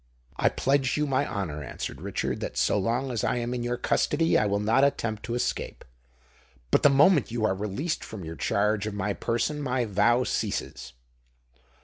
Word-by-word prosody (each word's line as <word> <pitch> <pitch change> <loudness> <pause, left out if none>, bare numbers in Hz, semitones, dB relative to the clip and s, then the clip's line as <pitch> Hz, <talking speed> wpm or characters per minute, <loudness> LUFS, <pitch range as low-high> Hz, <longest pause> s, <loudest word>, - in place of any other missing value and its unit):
"I - - +2
pledge 135 0 +1
you 150 - +1
my 140 0 0
honour," 80 -8 -4
answered 65 - -6
Richard, - - -2
"that - - -5
so - - +2
long 120 +6 -1
as 115 -3 -2
I - - +1
am 120 0 -2
in 125 - -3
your 120 0 -2
custody, 165 +5 +1
I 105 - +3
will 100 0 0
not 115 +6 +3
attempt 115 -6 0
to 120 - -3
escape. 120 - -3 0.9
But - - +4
the 145 - +6
moment 145 +2 +4
you 115 -1 -1
are 105 - +2
released 105 - -3
from 100 -6 -8
your 80 +1 -6
charge 105 +6 0
of 105 - -4
my 100 0 -1
person, 150 +9 -1
my 130 -3 0
vow 110 +4 +3
ceases." - - -3
120 Hz, 190 wpm, -27 LUFS, 105-135 Hz, 0.9 s, the